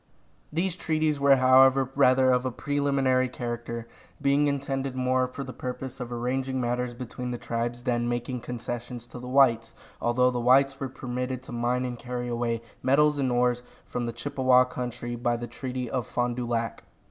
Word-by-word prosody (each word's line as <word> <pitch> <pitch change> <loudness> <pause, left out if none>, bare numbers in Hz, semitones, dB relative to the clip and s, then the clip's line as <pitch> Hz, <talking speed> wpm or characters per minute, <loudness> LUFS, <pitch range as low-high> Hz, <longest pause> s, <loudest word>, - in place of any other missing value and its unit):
These 175 +3 -1
treaties 155 -3 0
were, 140 0 +6
however, 130 0 +5
rather 130 -1 +5
of 125 0 +2
a 130 - 0
preliminary 135 -1 +1
character, 120 -1 -5 0.3
being 140 +1 +3
intended 135 -1 -2
more 130 0 +1
for 135 +2 -6
the 130 -1 -7
purpose 130 0 -6
of 125 -1 -5
arranging 130 +2 -1
matters 120 0 -1
between 125 0 -6
the 120 - -3
tribes 120 +1 -3
than 120 -1 0
making 120 +1 -3
concessions 120 0 -5
to 125 - -10
the 125 - -8
whites, 120 -4 +3 0.3
although 125 +2 +3
the 125 - -2
whites 135 +2 +4
were 135 - -3
permitted 125 0 -4
to - - -10
mine 120 +1 0
and 120 -1 -5
carry 125 0 -4
away 120 -1 -1 0.2
metals 145 +2 +3
and 130 -2 +1
ores 125 0 +2 0.2
from 120 -1 -3
the - - -2
Chippewa 130 -2 +3
country 125 -1 -5
by 120 0 0
the 120 - -5
treaty 125 0 -5
of 125 -1 -2
Fond 120 -1 -1
du 125 -1 -3
Lac. 115 -1 -2
125 Hz, 180 wpm, -27 LUFS, 120-135 Hz, 0.3 s, were